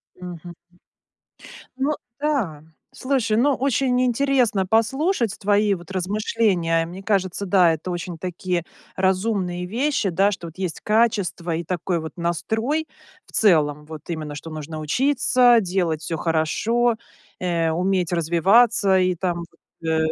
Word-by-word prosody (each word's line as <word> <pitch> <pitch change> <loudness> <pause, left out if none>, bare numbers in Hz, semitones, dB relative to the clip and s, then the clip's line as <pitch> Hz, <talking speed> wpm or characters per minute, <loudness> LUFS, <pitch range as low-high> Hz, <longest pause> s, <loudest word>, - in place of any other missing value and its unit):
Мгм. 175 -1 -9 1.2
Ну 275 +3 0 0.3
да, 230 - -1 0.3
слушай, 255 -5 0
но 270 +4 +3
очень 260 -1 +1
интересно 245 -6 +2
послушать 235 - +1
твои 205 0 +2
вот 175 +1 -11
размышления. 185 -3 0
Мне 180 +3 -9
кажется, 195 -1 -1
да, 180 -3 +5
это 160 +3 -5
очень 175 -1 -5
такие 180 -1 -3 0.3
разумные 185 -2 0
вещи, 235 -1 0
да, 195 +4 +3
что 175 -4 -6
вот 165 - -15
есть 185 -4 -3
качество 210 -6 +1
и 170 - -4
такой 175 0 -2
вот 160 0 -7
настрой 220 - -1 0.4
в - - -21
целом, 150 -7 +3
вот. 155 -1 -9
Именно, 155 -3 -4
что 165 +3 -8
нужно 155 0 -6
учиться, 245 - +3
делать 175 -4 -1
всё 165 - -3
хорошо, 215 +10 +1 0.4
э, 170 -3 0
уметь 180 +1 0
развиваться 190 +5 +4
и 185 0 +2
там 175 0 -2 0.4
вот, 165 - -5
э, 160 0 +2
185 Hz, 135 wpm, -22 LUFS, 170-225 Hz, 1.2 s, да